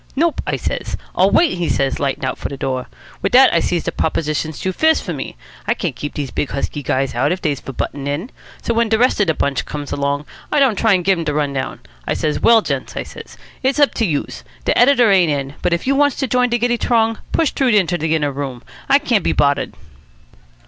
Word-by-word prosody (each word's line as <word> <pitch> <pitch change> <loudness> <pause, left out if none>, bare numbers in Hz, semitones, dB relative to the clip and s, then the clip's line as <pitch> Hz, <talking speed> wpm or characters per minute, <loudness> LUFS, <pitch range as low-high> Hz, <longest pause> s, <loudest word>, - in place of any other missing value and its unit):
'Nope,' 325 +3 +1
I - - 0
says. - - -3 0.2
'I'll - - +4
wait,' 180 - +2
says 135 -1 0
he - - -8
lightin' 140 0 -1
out 130 - -3
for - - -4
de 140 - -6
door. 130 -1 -3 0.3
Wit - - -1
dat 260 +1 +7
I 170 - +4
sees 175 0 -1
de - - -2
proposition's 155 -1 -2
too 185 - -2
fierce 315 - +3
for - - -5
muh. - - -5 0.3
I - - +2
can't 165 -9 -3
keep 145 +4 -6
dese 140 -3 -4
big 145 - -2
husky 140 +1 -3
guys 135 0 -1
out 120 +7 +1
if 180 - -1
dey's 150 -6 -1
for - - -8
buttin' 140 +1 -4
in. 155 - -3 0.3
So 235 - 0
when 230 0 +1
de 220 - +3
rest 250 +1 +2
of 205 - +2
de 160 - +1
bunch 140 -2 -1
comes 145 -1 -6
along, 140 +1 -1 0.3
I - - +1
don't 265 -6 +4
try 210 -2 +3
to 180 - -5
give 190 +1 +3
dem 165 - -3
de 150 - 0
t'run 145 -1 0
down. 130 -1 -4 0.3
I - - 0
says, 150 -1 -1
'Well, 230 -2 +5
gents,' - - -4
I - - -2
says, - - -12 0.2
'it's 265 +2 +1
up 290 - +4
to 230 - 0
youse. 150 -4 -3 0.2
De - - +2
editor 245 -3 +5
ain't 180 -5 +4
in, 140 -1 -2
but - - 0
if 170 - 0
youse 275 +1 +2
wants 285 -2 +3
to 275 - -1
join 250 +1 +2
de 240 - +1
giddy 240 0 0
t'rong, 225 -2 +1
push 325 -4 +2
t'roo 270 - 0
inter 185 -6 +2
de 160 -1 0
inner 145 -2 0
room. 135 -3 -5 0.3
I 275 - +7
can't 240 - +1
be - - +1
boddered.'" 140 -1 +1
170 Hz, 250 wpm, -18 LUFS, 145-235 Hz, 0.3 s, dat